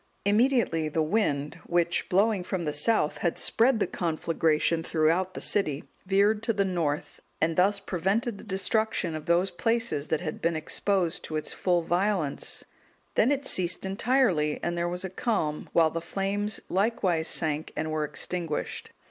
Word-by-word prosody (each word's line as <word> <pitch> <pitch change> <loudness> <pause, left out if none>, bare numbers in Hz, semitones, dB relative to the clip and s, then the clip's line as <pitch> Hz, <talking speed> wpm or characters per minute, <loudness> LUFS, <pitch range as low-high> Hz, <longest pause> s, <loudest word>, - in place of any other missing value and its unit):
Immediately 205 - +2
the 160 +1 0
wind, 155 -5 0
which 175 0 +1
blowing 200 +1 +2
from 180 -1 -3
the 150 -2 -2
south 150 +1 +1
had 170 - 0
spread 235 0 +3
the - - +2
conflagration 165 -1 0
throughout 165 +4 +1
the - - -5
city, 155 -9 0 0.2
veered 200 +2 +3
to 230 0 0
the 200 -1 +1
north, 155 -5 -2 0.2
and 165 +1 +1
thus 195 +3 +3
prevented 200 +5 -1
the - - -10
destruction 195 -2 0
of 155 -1 -6
those 175 +3 +3
places 225 -6 0
that 160 - 0
had 155 -4 -5
been 170 0 +1
exposed 180 +2 -1
to 155 - -5
its 155 - -2
full 175 -2 +1
violence, 175 -3 -1 0.5
then 240 - +3
it 280 -1 -1
ceased 180 -4 0
entirely 195 - +1
and 170 0 -1
there 170 0 -1
was 180 +2 -4
a - - -3
calm, 190 -8 -1
while 165 -2 +4
the 165 - -3
flames 200 +3 -2
likewise 185 -5 +1
sank 155 -1 0
and 155 0 -2
were 155 -1 0
extinguished. 165 +1 -3
175 Hz, 165 wpm, -27 LUFS, 160-205 Hz, 0.5 s, while